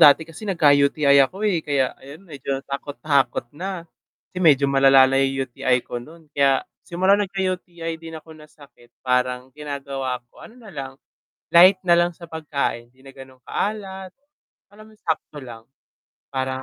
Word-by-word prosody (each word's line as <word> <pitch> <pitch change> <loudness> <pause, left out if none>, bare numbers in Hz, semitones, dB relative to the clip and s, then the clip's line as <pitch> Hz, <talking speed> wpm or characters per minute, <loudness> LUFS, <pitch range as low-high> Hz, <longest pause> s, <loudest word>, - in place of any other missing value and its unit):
dati 150 +2 +7
kasi 165 +6 -10
nagka-UTI 145 -4 +4
ako, 195 +3 -6
eh, 185 -6 +2
kaya 140 -4 0
ayun 145 +8 -13
medyo 140 -4 -4
natakot-takot 140 -2 -1
na, 180 +2 -5 0.5
kasi 185 - -5
medyo 145 -5 +5
malalala 135 -1 +6
na 135 - +3
'yong 135 0 0
UTI 125 0 0
ko 120 - -5
no'n 160 +6 -14
kaya, 140 -1 +2 0.2
simula 190 +4 +2
nagka-UTI 180 -4 -3
din 165 -1 -8
ako 160 +1 -12
na 155 -1 -15
sakit 140 -5 -20
parang 125 0 0
ginagawa 135 -4 -5
ko, - - -18
ano 230 - -13
na 220 -5 -13
lang, 135 -3 -7 0.5
light 185 +3 +7
na 175 -2 +3
lang 175 0 +2
sa 170 0 -13
pagkain, 140 -7 -3
hindi 130 - -27
na 135 0 -13
gano’ng 130 -1 -13
ka-alat, 190 - -4 0.6
alam 205 +2 -16
mo 220 - -18
yung 215 - -24
sakto 155 -1 -2
lang, 115 -4 -11 0.7
parang 130 -1 -3
145 Hz, 165 wpm, -22 LUFS, 135-175 Hz, 0.7 s, dati